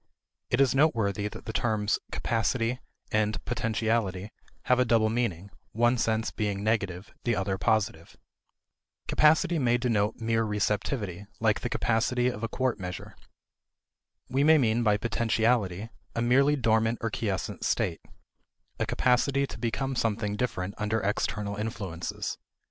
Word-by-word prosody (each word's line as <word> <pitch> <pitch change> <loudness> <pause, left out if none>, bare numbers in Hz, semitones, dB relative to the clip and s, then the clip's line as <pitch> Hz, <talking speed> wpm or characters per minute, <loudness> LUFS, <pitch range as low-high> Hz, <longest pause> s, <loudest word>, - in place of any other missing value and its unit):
It 120 - +1
is 135 -3 +4
noteworthy 110 -8 +2
that 105 - -9
the 110 - -5
terms 110 -3 0
"capacity" 115 +2 0 0.3
and 105 0 +1
"potentiality" 110 -4 -1 0.3
have 125 0 +3
a - - +6
double 115 -3 +3
meaning, 100 -5 -2 0.2
one 120 +2 +3
sense 110 0 0
being 100 -2 -2
negative, 100 -3 -1
the 120 -1 +1
other 95 -1 -1
positive. 105 -8 0 0.9
Capacity 160 +3 +4
may 120 -3 +3
denote 110 -3 +1
mere 115 0 0
receptivity, 105 -2 -2
like 110 -2 +2
the 125 - -3
capacity 120 +2 +1
of 110 -4 -6
a 115 - -1
quart 125 -2 -1
measure. 90 -1 -7 1.1
We 135 +2 +1
may 160 +1 +7
mean 120 -4 +2
by 105 -3 +3
potentiality 110 -3 0 0.3
a 115 - 0
merely 135 +5 +4
dormant 115 -2 +2
or 115 - -1
quiescent 100 -5 -3
state 85 -3 0 0.8
a - - 0
capacity 135 +2 +2
to - - -9
become 135 +3 -2
something 105 -3 0
different 100 -5 -2
under 105 +1 0
external 105 0 -1
influences. 100 -6 -4
110 Hz, 135 wpm, -28 LUFS, 105-120 Hz, 1.1 s, may